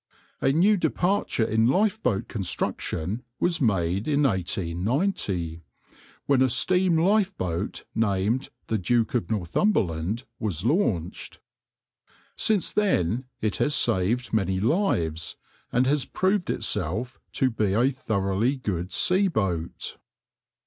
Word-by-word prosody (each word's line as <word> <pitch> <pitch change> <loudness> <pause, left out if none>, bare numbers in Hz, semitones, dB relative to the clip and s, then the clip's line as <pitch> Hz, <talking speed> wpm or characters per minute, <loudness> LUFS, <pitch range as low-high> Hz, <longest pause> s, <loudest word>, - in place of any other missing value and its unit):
A 135 - +3
new 190 +8 +4
departure 180 - 0
in 110 +1 +2
lifeboat 190 - +1
construction 95 0 -3 0.2
was 170 -2 +1
made 95 -3 +1
in 150 -1 +2
1890, 95 - -1 0.6
when 140 -2 +3
a 130 - +4
steam 180 +7 +2
lifeboat, 170 - 0
named 110 +4 0 0.2
the 110 - -1
Duke 115 +4 +1
of 120 - -1
Northumberland, 100 - 0 0.2
was 95 -4 -3
launched. 115 - -1 1.0
Since 210 -4 +1
then 130 - +1 0.2
it 105 -1 0
has 145 -1 +2
saved 115 +3 +1
many 95 -3 +1
lives, 85 - 0 0.4
and 125 +1 +2
has 140 +1 +1
proved 190 0 0
itself 110 +11 -2
to 130 -1 +1
be 105 -4 0
a 120 +6 +3
thoroughly 110 0 0
good 95 -7 -3
sea 190 +2 +3
boat. 90 - -2
115 Hz, 115 wpm, -26 LUFS, 95-150 Hz, 1.0 s, new